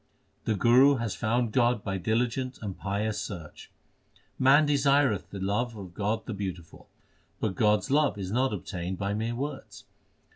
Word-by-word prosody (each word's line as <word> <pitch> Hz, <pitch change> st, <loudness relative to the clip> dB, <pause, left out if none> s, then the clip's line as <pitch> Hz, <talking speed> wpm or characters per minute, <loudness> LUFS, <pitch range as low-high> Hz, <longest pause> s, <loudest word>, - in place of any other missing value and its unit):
The 110 Hz, -, +1 dB
Guru 125 Hz, +7 st, +5 dB
has 115 Hz, -4 st, -2 dB
found 120 Hz, 0 st, 0 dB
God 120 Hz, -2 st, +2 dB
by 95 Hz, -1 st, -2 dB
diligent 125 Hz, +5 st, -1 dB
and 100 Hz, -3 st, -4 dB
pious 105 Hz, +2 st, -2 dB
search: 85 Hz, -7 st, -8 dB, 0.7 s
Man 135 Hz, +4 st, +6 dB
desireth 140 Hz, -6 st, +2 dB
the 100 Hz, -, -7 dB
love 105 Hz, +5 st, -1 dB
of 95 Hz, -4 st, -9 dB
God 110 Hz, +3 st, -2 dB
the 120 Hz, -, -4 dB
Beautiful, 90 Hz, -5 st, -7 dB, 0.5 s
But 105 Hz, -, -1 dB
God 105 Hz, +2 st, +3 dB
s -, -, -7 dB
love 145 Hz, -4 st, +3 dB
is 95 Hz, -2 st, -5 dB
not 130 Hz, +4 st, +1 dB
obtained 90 Hz, -2 st, -4 dB
by 100 Hz, +1 st, -2 dB
mere 115 Hz, +3 st, -2 dB
words. 120 Hz, -7 st, -6 dB
110 Hz, 160 wpm, -28 LUFS, 100-125 Hz, 0.7 s, Man